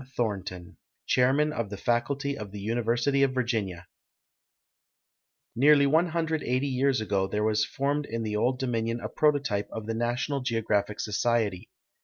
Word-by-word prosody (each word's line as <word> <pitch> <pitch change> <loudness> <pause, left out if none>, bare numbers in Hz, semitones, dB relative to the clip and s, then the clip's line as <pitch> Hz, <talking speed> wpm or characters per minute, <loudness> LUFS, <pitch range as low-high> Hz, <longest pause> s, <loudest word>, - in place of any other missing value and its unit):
Thornton, 95 -6 -3 0.3
Chairman 135 +5 +3
of 115 -8 -3
the 100 - -6
Faculty 135 +6 -1
of 105 -6 -7
the 105 - -7
University 120 +5 0
of 135 -1 +2
Virginia 110 -8 -2 1.7
Nearly 140 +3 +6
180 160 -4 +1
years 130 -1 +1
ago 100 -3 0
there 105 +2 -1
was 110 0 +2
formed 140 +2 -1
in 115 +1 -3
the 105 -1 -2
Old 125 +4 +1
Dominion 115 -3 -1
a - - -5
prototype 140 -10 +1
of 110 -1 -6
the 115 - -2
National 120 +5 -1
Geographic 110 -4 -1
Society. 105 -3 0
120 Hz, 140 wpm, -27 LUFS, 105-140 Hz, 1.7 s, Nearly